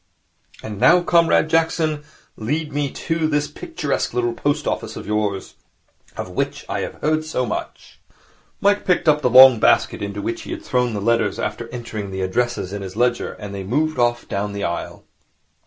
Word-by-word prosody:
And 105 -2 -6
now, 175 - +5
Comrade 170 -2 +3
Jackson, 160 -2 +1 0.3
lead 150 +7 -3
me 145 -1 0
to 165 +2 -2
this 150 -1 0
picturesque - - -3
little 120 -1 0
post 145 +4 -1
office - - -3
of - - -7
yours 105 -2 -2 0.6
of - - -4
which - - -3
I - - -2
have - - -4
heard 155 +1 +1
so 155 -5 -2
much.' 110 - -6 0.6
Mike 205 +1 +3
picked 180 -2 +1
up 150 -1 +4
the 125 - +2
long 130 -1 +9
basket - - +3
into 100 0 -4
which 115 +3 -3
he - - -10
had - - -7
thrown 125 -3 0
the 100 - -3
letters 115 +2 +1
after 120 - -4
entering 115 -4 -6
the 95 0 -4
addresses 100 0 -1
in 100 - -4
his 95 -1 -7
ledger, 120 +1 0
and 100 -1 -8
they 100 -1 -5
moved 150 +8 -1
off 120 0 +1
down 100 +1 -3
the 100 -1 -4
aisle. 85 - -4
120 Hz, 185 wpm, -21 LUFS, 105-155 Hz, 0.6 s, long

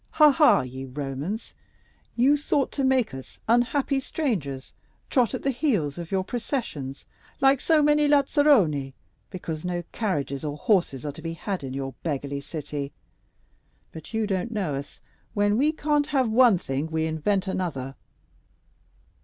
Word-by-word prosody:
Ha, 305 -1 +7
ha, 300 +2 +5
ye 130 +1 -7
Romans! 140 - -5 0.6
you 260 +5 +5
thought 285 -1 0
to 275 - -2
make 260 - +2
us, 130 -1 -10
unhappy 255 +4 +2
strangers, 185 - -3 0.4
trot 255 -2 +2
at - - -6
the 275 - +2
heels 210 - 0
of 170 +1 -7
your 190 -1 +1
processions, 190 - -4 0.3
like 270 -1 +4
so 315 -2 +4
many 295 0 +4
lazzaroni, 270 - +3 0.3
because 165 -4 -5
no 175 -1 -2
carriages 145 -10 -2
or 150 -1 -3
horses 170 - +1
are 145 - -2
to 160 - -11
be 165 0 -4
had 180 +1 -4
in 130 -1 -5
your 135 -1 -4
beggarly 140 -2 -3
city. 145 -1 -5 1.0
But 160 -1 -10
you 225 -1 0
don't 190 +1 -1
know 200 -10 -2
us; 140 +1 -7 0.3
when 205 0 +3
we 285 +7 +3
can't 295 -1 0
have 265 -6 +1
one 235 -3 +6
thing 140 -1 -3
we 160 0 -1
invent 170 +5 0
another." 160 -9 -3
185 Hz, 155 wpm, -25 LUFS, -, 1.0 s, Ha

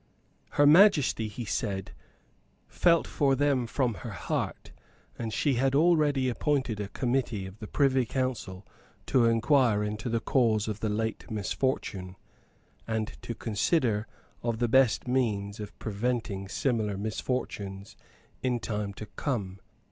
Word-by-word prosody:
Her 145 - +4
Majesty, 150 - +5
he 110 +3 -6
said, 100 -3 -2 0.8
felt 170 -2 +3
for 135 -2 +1
them 140 -4 +1
from 125 0 0
her 120 - -6
heart; 85 - -3 0.4
and 115 -2 -4
she 140 +5 +1
had 135 +2 +1
already 150 -4 +3
appointed 130 -3 0
a 105 - -3
Committee 120 -4 -1
of 95 +2 -10
the 110 - -7
Privy 135 -2 +2
Council 120 -8 -3 0.4
to 125 -3 +3
inquire 115 -1 +3
into 105 +3 -3
the 115 0 +1
cause 115 -4 +2
of 105 -1 -3
the 110 - -1
late 110 +1 -2
misfortune, 100 -3 -2 0.7
and 110 -1 -2
to 115 - -5
consider 110 - 0 0.3
of 115 -1 -1
the 120 +1 +1
best 125 -3 +3
means 105 -6 0
of 105 -1 -8
preventing 110 -2 -2
similar 105 +1 0
misfortunes 100 -2 -4 0.5
in 125 -2 0
time 105 -3 -3
to 110 - -7
come. 100 -8 -3
115 Hz, 135 wpm, -28 LUFS, 105-130 Hz, 0.8 s, Majesty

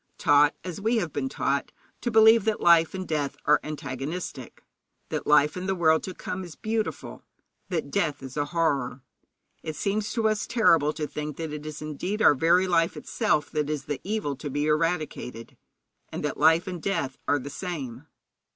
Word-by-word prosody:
Taught, 145 0 +4
as 180 +1 -6
we 225 +4 +1
have 175 -8 -2
been 265 - -2
taught, - - -1 0.3
to 240 - -1
believe 220 -1 +6
that 220 -1 +1
life 170 0 +5
and 185 -1 -5
death 145 -3 -2
are 150 - +5
antagonistic, 145 -1 -6 0.5
that - - -3
life 150 0 +4
in 185 +1 -4
the 190 - 0
world 160 -2 +3
to 185 - -7
come 190 +1 -5
is 175 -3 -10
beautiful, 220 0 -3 0.5
that 160 -6 -2
death 155 -8 -1
is 130 -1 -8
a 145 -1 0
horror, 140 -6 -1 0.6
it 155 - -5
seems 210 +3 -1
to 225 -3 +1
us 215 -1 0
terrible 165 - +4
to 155 0 -4
think 150 0 -5
that 160 -2 -4
it 150 0 -6
is 155 0 -7
indeed 155 +8 -3
our 210 - +6
very 170 +6 +3
life 165 -2 +2
itself 205 -10 0
that 150 -1 -1
is 150 -2 -3
the 145 -2 -4
evil 200 -8 -2
to 145 +1 -6
be 145 +2 -1
eradicated, 155 -7 -2 0.5
and - - -4
that - - -2
life 160 +3 +5
and 180 -3 -5
death 140 -9 -2
are 145 - +3
the 140 +1 -7
same. 145 -8 -6
160 Hz, 190 wpm, -26 LUFS, 145-190 Hz, 0.6 s, believe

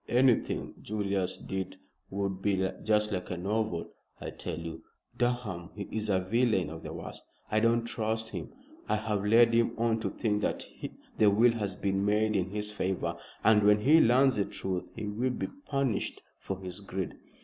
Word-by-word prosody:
"Anything 125 0 +2
Julius 100 -3 -1
did 95 -1 -4 0.3
would 100 -1 -2
be 95 -2 +2 0.2
just 105 0 +2
like 90 -2 -3
a 90 - -3
novel. 100 -1 -1 0.3
I - - -5
tell - - -5
you, 80 -1 -6 0.3
Durham, 120 -8 -1
he 105 - -4
is 110 -1 -2
a 95 -2 +3
villain 95 -3 +1
of 80 0 -7
the - - -6
worst; - - -7 0.3
I 110 - +4
don't 115 +1 +3
trust 110 -1 -2
him. - - -6 0.4
I - - +3
have 105 -2 -1
led 115 +2 +6
him 115 0 +2
on 115 0 +2
to - - -1
think 105 -2 0
that - - -1 0.5
the 105 - +7
will 115 +4 +5
has 105 -5 -2
been 95 +1 0
made 105 +1 +2
in 95 -1 +1
his 105 +1 -3
favor; 95 -2 -1 0.3
and 110 -1 +6
when 105 0 +5
he 155 +7 +7
learns 130 +2 +5
the 100 - +2
truth 95 -2 -3
he - - -4
will 110 +5 0
be 125 - -3 0.2
punished 135 -5 -1 0.2
for 95 - -4
his 95 0 -7
greed." 95 -2 -4
105 Hz, 180 wpm, -30 LUFS, 95-115 Hz, 0.5 s, the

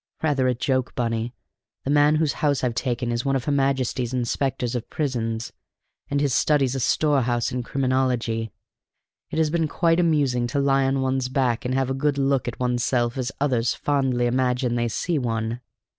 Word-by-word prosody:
Rather 140 -4 +2
a 125 - +1
joke, 130 +1 -1
Bunny: 115 -1 -1 0.5
the 135 - -1
man 145 +1 +5
whose 155 -2 +1
house 145 -3 +1
I've 125 -2 +1
taken 120 0 -2
is 120 0 -1
one 135 -1 +1
of 130 - -2
her 145 - 0
Majesty's 130 -3 0
inspectors 125 0 -1
of 120 -2 -4
prisons, 120 -6 -2 0.6
and 145 - 0
his 140 -3 +1
study's 140 -4 +2
a 135 - -2
storehouse 125 -3 +1
of 125 -1 -2
criminology. 125 -4 0 0.8
It - - -5
has 160 -2 +2
been 165 -1 +1
quite 165 +2 +2
amusing 140 -8 +2
to 135 +4 -1
lie 135 -1 +3
on 135 0 +1
one's 130 -1 0
back 130 -1 0
and 125 +1 0
have 135 -1 0
a - - +1
good 140 +1 0
look 135 -2 +1
at 120 - -5
one's 125 -1 0
self 120 -2 +1
as 130 -1 -2
others 125 -5 +1
fondly 135 -4 0
imagine 125 0 +1
they 120 0 0
see 150 - -1
one." 115 -1 -2
130 Hz, 190 wpm, -24 LUFS, 120-140 Hz, 0.8 s, man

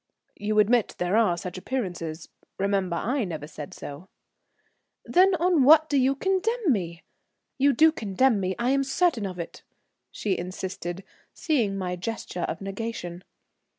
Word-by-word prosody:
"You 215 +1 -1
admit 220 +2 +3
there 180 +3 0
are 215 -6 +3
such 180 +1 -6
appearances? 175 -9 -4 0.3
Remember, 195 -3 0
I 245 +9 0
never 160 -6 -5
said 150 -1 -9
so." 150 +7 -9 1.0
"Then 370 +1 +4
on 345 -3 +3
what 315 +3 +7
do 285 - +2
you 265 +1 +3
condemn 385 - +1
me? 170 -7 -2 0.6
You 280 +2 +5
do 315 +5 +5
condemn 225 -2 +1
me, 185 -1 -1
I 240 +2 +1
am 275 0 +2
certain 270 - +1
of 185 -2 -7
it," 170 - -7 0.5
she 200 -3 -2
insisted, 185 0 -5 0.3
seeing 235 - 0
my 180 -2 -3
gesture 180 -2 -4
of - - -5
negation. 195 -3 -5
205 Hz, 150 wpm, -26 LUFS, 180-275 Hz, 1.0 s, what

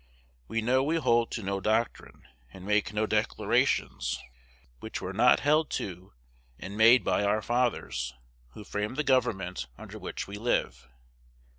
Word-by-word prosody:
We 115 0 -2
know 130 +3 +3
we 155 +4 0
hold 120 -7 +2
to 115 - -4
no 100 0 -2
doctrine, 110 +3 -1 0.3
and 95 +3 -11
make 105 0 +1
no 105 +1 0
declarations, 105 - 0 0.6
which - - -6
were - - -5
not - - +5
held 155 +2 +3
to 90 0 -7 0.4
and 100 +2 -8
made 115 +3 +6
by - - +1
our 105 +2 +1
fathers, 120 - -1 0.4
who 105 - -10
framed 105 +5 -4
the 150 - +1
government 115 - 0
under - - -10
which - - -5
we 100 +1 -7
live. 115 - -1
110 Hz, 150 wpm, -28 LUFS, 100-125 Hz, 0.6 s, made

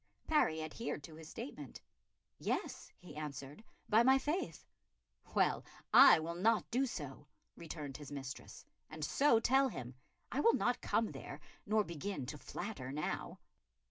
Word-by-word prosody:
Parry 160 - +2
adhered 155 -1 -4
to 155 - -10
his 155 0 -11
statement. 145 -3 -7 0.6
"Yes," - - -3
he 180 - -12
answered, 145 +3 -6 0.2
"by 220 +2 +5
my 265 +2 +6
faith." 305 +7 -2 0.7
"Well, - - +3 0.3
I - - +10
will 160 +1 -3
not 215 +6 +2
do 265 +3 +2
so," 145 - -7 0.3
returned 150 -5 -6
his 145 -2 -10
mistress, 135 -2 -7 0.2
"and 155 -1 -4
so 270 - +4
tell 270 +4 +4
him. 125 - -6 0.4
I 265 - -1
will 460 +10 +5
not - - +1
come - - +1
there, - - -8 0.3
nor 215 0 +3
begin 170 -3 -4
to 145 +3 -6
flatter 140 -11 -5
now." 150 +2 -3
160 Hz, 145 wpm, -36 LUFS, 145-230 Hz, 0.7 s, I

